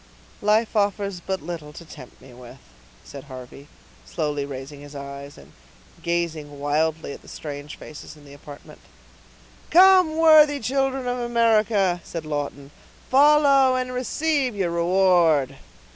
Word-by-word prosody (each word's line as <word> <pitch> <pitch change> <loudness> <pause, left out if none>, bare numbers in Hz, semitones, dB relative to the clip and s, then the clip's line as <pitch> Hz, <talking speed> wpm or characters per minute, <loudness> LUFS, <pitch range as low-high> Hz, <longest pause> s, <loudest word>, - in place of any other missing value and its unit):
"Life 215 +2 +1
offers 200 -2 -1
but 190 +2 -5
little 160 -3 -7
to 170 - -11
tempt 145 -5 -13
me 130 -1 -15
with," 125 +1 -13 0.5
said 140 -1 -11
Harvey, 130 +1 -11 0.4
slowly 150 -4 -3
raising 140 +1 -9
his 145 0 -12
eyes, 140 0 -9
and 70 +1 -16 0.5
gazing 160 -4 -3
wildly 155 +1 -1
at - - -12
the - - -19
strange 145 -1 -8
faces 155 0 -11
in 145 - -18
the 140 - -14
apartment. 145 0 -13 0.9
"Come, 365 -3 +5
worthy 310 -3 +6
children 270 +1 -1
of 245 0 -2
America!" 220 -6 +1
said 165 -2 -7
Lawton, 145 -2 -5 0.4
"follow, 275 -1 +5
and 255 0 -3
receive 265 0 -1
your 185 -4 -1
reward." 170 -6 +2
170 Hz, 135 wpm, -23 LUFS, -, 0.9 s, worthy